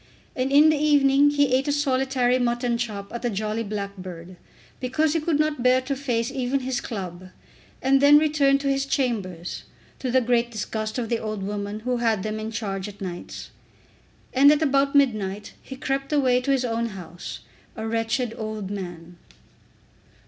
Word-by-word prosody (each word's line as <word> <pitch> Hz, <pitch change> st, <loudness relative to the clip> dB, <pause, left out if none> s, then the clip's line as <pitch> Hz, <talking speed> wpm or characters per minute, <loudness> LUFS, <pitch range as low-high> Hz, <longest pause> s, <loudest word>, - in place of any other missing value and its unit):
And 260 Hz, +1 st, -1 dB
in 300 Hz, +3 st, +7 dB
the 310 Hz, -, +1 dB
evening 285 Hz, -1 st, +4 dB
he 285 Hz, -3 st, +2 dB
ate 265 Hz, +3 st, +2 dB
a -, -, +2 dB
solitary 265 Hz, -3 st, +1 dB
mutton 240 Hz, 0 st, 0 dB
chop 205 Hz, -4 st, -4 dB
at 235 Hz, -, -4 dB
The 245 Hz, -, 0 dB
Jolly 215 Hz, +1 st, -2 dB
Blackbird, 190 Hz, -4 st, -6 dB, 0.4 s
because 295 Hz, +5 st, +1 dB
he 330 Hz, -, +1 dB
could 305 Hz, -1 st, 0 dB
not 305 Hz, -4 st, 0 dB
bear 255 Hz, +1 st, +4 dB
to 275 Hz, +2 st, -3 dB
face 240 Hz, -4 st, -1 dB
even 265 Hz, +1 st, -1 dB
his 255 Hz, -1 st, -2 dB
club, 185 Hz, -4 st, -6 dB, 0.5 s
and 270 Hz, +1 st, +4 dB
then 290 Hz, +1 st, +8 dB
returned 290 Hz, -2 st, +3 dB
to 280 Hz, -, -2 dB
his 275 Hz, 0 st, 0 dB
chambers, 200 Hz, -11 st, -2 dB, 0.3 s
to 260 Hz, -, -3 dB
the 260 Hz, +1 st, +4 dB
great 240 Hz, -1 st, +1 dB
disgust 215 Hz, 0 st, -4 dB
of 240 Hz, -2 st, -2 dB
the 235 Hz, -, 0 dB
old 215 Hz, -2 st, -4 dB
woman 205 Hz, +1 st, -4 dB
who 250 Hz, +2 st, -1 dB
had 225 Hz, -5 st, +1 dB
them 215 Hz, 0 st, -3 dB
in 215 Hz, 0 st, -4 dB
charge 200 Hz, -4 st, -4 dB
at 205 Hz, -1 st, -11 dB
nights. 180 Hz, -3 st, -7 dB, 0.8 s
And 280 Hz, +3 st, +7 dB
at 300 Hz, +1 st, +2 dB
about 275 Hz, -1 st, +2 dB
midnight 210 Hz, -7 st, +1 dB
he 265 Hz, -, -9 dB
crept 270 Hz, +1 st, -3 dB
away 255 Hz, -4 st, +3 dB
to 255 Hz, -, -4 dB
his 265 Hz, -2 st, +1 dB
own 230 Hz, 0 st, -1 dB
house, 180 Hz, -4 st, -8 dB, 0.3 s
a 220 Hz, -1 st, -4 dB
wretched 225 Hz, +1 st, -1 dB
old 215 Hz, -3 st, -5 dB
man. 175 Hz, -3 st, -7 dB
245 Hz, 180 wpm, -24 LUFS, 210-275 Hz, 0.8 s, then